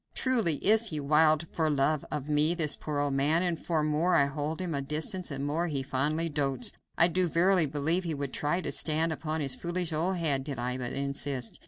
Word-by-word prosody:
Truly 230 - +2
is 220 +3 +5
he 155 -6 -4
wild 155 +2 +3
for 160 -2 +1
love 145 +1 +1
of 150 -2 -4
me, 150 +3 +2
this 155 -4 +1
poor 150 -1 -5
old 145 -1 0
man, 150 +5 +1
and 175 -2 0
the 160 -1 -1
more 155 +4 +1
I 140 - +5
hold 150 +3 -4
him 180 -3 -3
at - - -1
a 135 - -7
distance 160 +5 -2
the 140 - -4
more 145 +5 -1
he 140 -4 -2
fondly 150 +5 0
dotes. 145 - +1 0.2
I 170 - +6
do 180 +1 +1
verily 175 0 +3
believe 150 +6 0
he 165 -3 -3
would 140 -2 -5
try 160 +5 0
to - - -3
stand 160 +1 0
upon 155 0 -4
his 135 -2 0
foolish 175 +3 -2
old 175 +5 0
head, 150 -6 0
did 140 -1 -5
I 125 +1 -3
but 120 -1 -4
insist. 140 -3 -3
155 Hz, 225 wpm, -29 LUFS, 140-170 Hz, 0.2 s, I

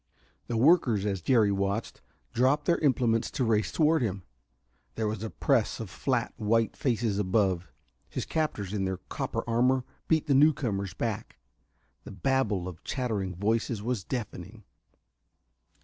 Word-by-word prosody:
The 120 - -1
workers, 120 - +4
as 100 -3 -1
Jerry 110 +1 +3
watched, 100 +2 -2 0.3
dropped 135 +5 +2
their 170 - +2
implements 125 -6 +2
to 135 - -2
race 110 -2 +1
toward 160 -1 +3
him. 100 -5 -2 0.7
There 110 -1 -1
was 105 -1 -3
a 110 - -3
press 125 -3 +1
of 110 -5 -6
flat, 125 -3 -1
white 115 0 +1
faces 115 -5 0
above. 95 -3 +1 0.4
His - - -4
captors, 105 - -2
in 100 -2 0
their 95 0 -2
copper 95 - -4
armor, 125 +3 +2 0.2
beat 160 -1 +2
the 145 - +2
newcomers 125 - +2
back. - - -4 0.7
The - - -10
babel 105 -3 0
of 90 -2 -9
chattering 105 -8 -2
voices 110 +2 -1
was 120 -4 -2
deafening. 110 -2 -6
115 Hz, 145 wpm, -28 LUFS, 100-130 Hz, 0.7 s, workers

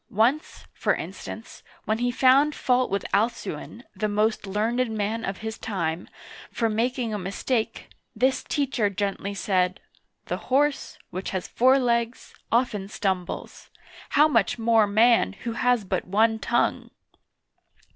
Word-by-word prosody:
^ - - -50
Once, 245 +9 +1
for - - +1
instance, - - -8 0.2
when 220 +1 0
he 245 0 +1
found 270 +4 +4
fault 250 0 +1
with 200 +1 -2
Al'cuin 215 -1 -2
— - - -43
the 215 - +2
most 210 0 0
learned 225 +5 0
man 220 +1 -2
of 195 -2 -3
his 220 0 -5
time 175 -5 -3 0.2
— - - -15
for 230 -1 0
making 235 +1 -1
a 210 - -2
mistake, 220 +5 -2 0.3
this 260 +4 +1
teacher 265 -8 0
gently 200 0 -3
said: 185 -2 0 0.2
" - - -49
The - - -3
horse, 285 +2 +1
which 185 +2 -4
has 185 -2 -3
four 260 +3 +4
legs, 235 -2 -1 0.2
often 225 -5 +1
stumbles; 190 -3 -4 0.5
how 300 +2 +7
much 230 -9 +1
more 225 -2 +3
man, 215 - +4
who 235 - -2
has 245 -1 +1
but 185 -1 -2
one 220 +3 +2
tongue 230 +4 0
225 Hz, 150 wpm, -25 LUFS, 200-245 Hz, 0.5 s, how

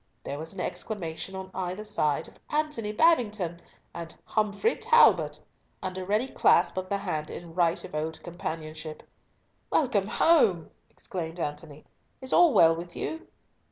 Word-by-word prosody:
There 140 - -5
was 160 +1 -6
an 195 - -9
exclamation 185 -2 -4
on 190 0 -7
either 185 +2 -3
side 160 -7 0
of - - -18
"Antony 300 -8 -1
Babington!" 210 - +2 0.3
and 165 -1 -7
"Humfrey 215 - +1
Talbot!" 470 +1 +4 0.4
and 185 0 -3
a 185 - -4
ready 210 +7 +1
clasp 175 -8 +3
of 185 0 -4
the 200 - +1
hand 155 -6 -3
in 170 -1 -8
right 170 -1 +1
of - - -10
old 155 +1 -3
companionship. 160 -3 -6 0.7
"Welcome 230 -10 +2
home!" 215 - +3 0.2
exclaimed 170 -2 -6
Antony. 150 -1 -5 0.3
"Is 260 -1 -3
all 345 -2 +7
well 165 -8 +6
with 170 +1 -8
you?" 320 - -4
185 Hz, 150 wpm, -28 LUFS, 165-215 Hz, 0.7 s, all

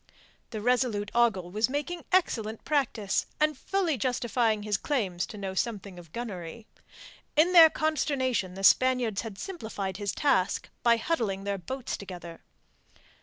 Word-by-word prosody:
The 215 -3 -5
resolute 235 -4 +1
Ogle 220 -7 +2
was 215 +4 +1
making 295 +5 -3
excellent 225 - 0
practice, 255 -9 0
and 305 0 +2
fully 345 0 -1
justifying 235 -3 0
his 210 -1 0
claims 190 -8 -1
to 215 - -9
know 195 -2 -4
something 200 -3 -3
of 170 -3 -14
gunnery. 215 -2 -6 0.7
In 325 +4 +4
their 330 -2 +10
consternation 260 - 0
the 195 - -7
Spaniards 250 -2 +4
had 220 -4 -8
simplified 220 - -5
his 200 -1 -2
task 200 -10 +1
by 235 0 +4
huddling 225 -8 -1
their 200 -1 -2
boats 255 +8 -4
together. 175 -4 -9
225 Hz, 140 wpm, -28 LUFS, 195-265 Hz, 0.7 s, their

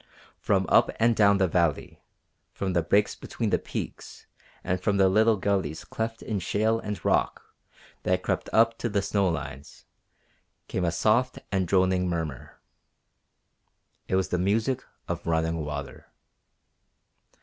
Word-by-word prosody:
From - - +1
up - - +5
and 115 0 +4
down 100 -2 +5
the 95 -1 +2
valley, 85 -3 -1 0.5
from 95 -2 -2
the 85 - +2
breaks 100 +6 +2
between - - -4
the - - +2
peaks - - -7 0.4
and 90 0 -1
from 100 +1 +1
the 95 -1 +5
little 110 +3 +4
gullies 95 -6 -1
cleft 115 0 -4
in 105 -3 -2
shale 110 +5 +1
and 105 -6 -6
rock - - +1 0.6
that - - 0
crept - - -2
up 115 +1 +3
to 120 - -1
the 100 -2 0
snow 100 0 +1
lines, 75 -3 -6 0.8
came 90 - -2
a 85 - +1
soft 115 +8 +1
and 95 -3 0
droning 95 0 +2
murmur. 80 -6 -5 1.5
It - - 0
was 95 0 +1
the 90 - 0
music 110 +7 0 0.2
of - - -4
running 80 0 0
water. 75 -2 -6
95 Hz, 145 wpm, -27 LUFS, 85-105 Hz, 1.5 s, up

